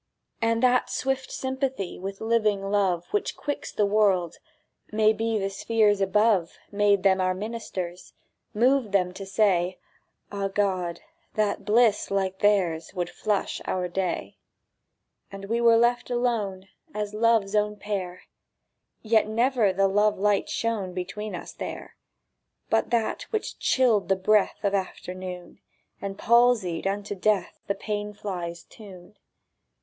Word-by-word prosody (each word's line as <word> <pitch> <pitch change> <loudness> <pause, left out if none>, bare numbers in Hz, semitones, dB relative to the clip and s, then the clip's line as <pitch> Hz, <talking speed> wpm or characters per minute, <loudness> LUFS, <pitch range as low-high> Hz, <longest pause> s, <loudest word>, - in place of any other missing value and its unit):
And 230 +1 +1
that 250 0 +3
swift 265 0 -2
sympathy 265 -7 -3
With 195 +1 -6
living 215 -3 +1
love 185 -4 +1
Which 415 0 -1
quicks 290 - -4
the 210 - +1
world—maybe 215 +3 0
The 195 -1 -2
spheres 210 -1 +2
above, 195 -2 +2
Made 200 -1 +3
them 190 -1 +4
our 185 0 +1
ministers, 185 -4 -6 0.4
Moved 245 -1 +2
them 180 -2 +2
to 195 +1 -8
say, 190 -3 +2 0.5
"Ah, 200 -1 -2
God, 185 -4 -1 0.3
that 210 -2 0
bliss 220 0 +3
like 190 -1 -1
theirs 185 -5 +1
Would 175 -1 -2
flush 210 -2 -2
our 180 -1 -1
day!" 180 0 -3 0.9
And 195 0 -8
we 230 +3 -1
were 230 -1 +6
left 240 +1 +2
alone 225 -6 -1 0.3
As 210 0 -3
Love's 220 -2 +2
own 210 0 +1
pair; 190 -3 -5 0.8
Yet 220 -1 +3
never 230 -1 +2
the 195 +1 +2
love 210 +2 +2
light 205 0 +1
shone 210 -6 -2
Between 195 +4 -5
us - - -8
there! - - -7 0.8
But 225 - +2
that 235 - -1
which 435 -2 -3
chilled 235 -7 +2
the 195 - +4
breath 205 +3 +2
Of 200 -1 +1
afternoon, 185 -2 -5 0.4
And 195 0 -5
palsied 230 -8 +3
unto 205 +1 -2
death 200 -1 0
The 200 - 0
pane 210 0 -4
fly's 175 -4 -5
tune. 195 -2 -14
205 Hz, 135 wpm, -26 LUFS, 190-225 Hz, 0.9 s, were